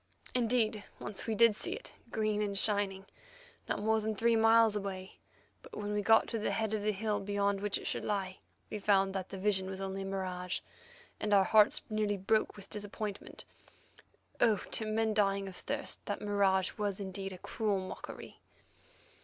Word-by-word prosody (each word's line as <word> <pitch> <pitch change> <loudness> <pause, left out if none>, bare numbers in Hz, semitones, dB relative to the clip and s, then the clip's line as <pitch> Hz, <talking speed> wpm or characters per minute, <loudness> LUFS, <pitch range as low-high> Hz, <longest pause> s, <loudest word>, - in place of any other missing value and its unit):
Indeed, 230 -3 +1 0.2
once 205 +2 -5
we 220 - 0
did 230 0 +6
see 210 - -3
it, - - -7 0.2
green 215 -2 0
and 200 -1 -1
shining, 200 -2 +3 0.6
not - - 0
more 220 0 +2
than 215 0 -2
three 230 +3 +3
miles 225 -1 +5
away, 195 -2 -5 0.4
but - - -11
when 205 0 -3
we 210 - +1
got 225 +2 +5
to 230 - -2
the 215 - -1
head 220 -1 -1
of 215 - 0
the 215 +1 +1
hill 210 +1 -1
beyond 200 0 0
which 205 -1 0
it - - -9
should - - -2
lie 190 -3 -2 0.3
we 210 - -3
found 195 -1 +3
that 190 -1 -4
the 195 - -6
vision 190 -1 +1
was 190 0 -5
only 195 0 -3
a - - -4
mirage, 185 -2 -3 0.6
and 210 -1 +2
our 195 - +6
hearts 210 +2 +5
nearly 215 -1 0
broke 215 +3 +1
with 200 -2 -11
disappointment. 210 -1 -6 0.9
Oh! 220 -3 +4
to 220 - -1
men 220 0 +1
dying 200 -2 +1
of 190 - -8
thirst, - - -4
that - - -2
mirage 200 -2 +1
was 205 -2 -1
indeed 195 0 -5
a 185 - -8
cruel 210 +2 -1
mockery. 185 0 -8
205 Hz, 185 wpm, -32 LUFS, 195-215 Hz, 0.9 s, did